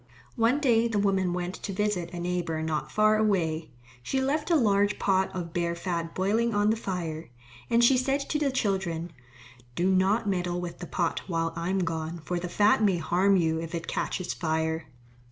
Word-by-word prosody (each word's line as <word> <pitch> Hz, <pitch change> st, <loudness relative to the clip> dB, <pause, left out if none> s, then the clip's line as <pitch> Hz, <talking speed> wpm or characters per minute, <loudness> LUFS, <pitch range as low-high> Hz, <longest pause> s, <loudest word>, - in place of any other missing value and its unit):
One 235 Hz, +4 st, +2 dB
day 235 Hz, -5 st, +3 dB
the 225 Hz, -3 st, -1 dB
woman 195 Hz, -3 st, +1 dB
went 180 Hz, +1 st, -3 dB
to 200 Hz, -, -4 dB
visit 190 Hz, -4 st, -1 dB
a 175 Hz, -, -6 dB
neighbour 175 Hz, -2 st, -2 dB
not 155 Hz, -4 st, -2 dB
far 215 Hz, 0 st, +4 dB
away. 170 Hz, -7 st, 0 dB, 0.3 s
She 265 Hz, -, -1 dB
left 295 Hz, +4 st, 0 dB
a 340 Hz, -, +4 dB
large 205 Hz, -6 st, +3 dB
pot 190 Hz, -1 st, +2 dB
of 170 Hz, -3 st, -5 dB
bear 170 Hz, -1 st, -1 dB
fat 170 Hz, -1 st, -3 dB
boiling 215 Hz, +4 st, +1 dB
on 205 Hz, +1 st, +3 dB
the -, -, +1 dB
fire. 170 Hz, -, -4 dB, 0.4 s
And 235 Hz, +1 st, +4 dB
she 255 Hz, +2 st, +6 dB
said 270 Hz, +2 st, +1 dB
to 300 Hz, -, +1 dB
the 290 Hz, -2 st, +1 dB
children, 190 Hz, -9 st, -1 dB, 0.6 s
"Do 180 Hz, +5 st, +2 dB
not 195 Hz, +4 st, +2 dB
meddle 180 Hz, -2 st, -1 dB
with 175 Hz, -1 st, -6 dB
the 175 Hz, -, -6 dB
pot 170 Hz, -3 st, -1 dB
while 165 Hz, -2 st, -1 dB
I 170 Hz, +1 st, -3 dB
am 190 Hz, 0 st, +1 dB
gone, 165 Hz, 0 st, -3 dB
for 180 Hz, -1 st, -1 dB
the 180 Hz, 0 st, -5 dB
fat 210 Hz, +4 st, +3 dB
may 195 Hz, -4 st, +3 dB
harm 180 Hz, +4 st, +2 dB
you 160 Hz, -2 st, +1 dB
if 165 Hz, +1 st, -5 dB
it 165 Hz, -, -4 dB
catches 185 Hz, -, -2 dB
fire." 160 Hz, -1 st, -1 dB
185 Hz, 195 wpm, -27 LUFS, 170-210 Hz, 0.6 s, she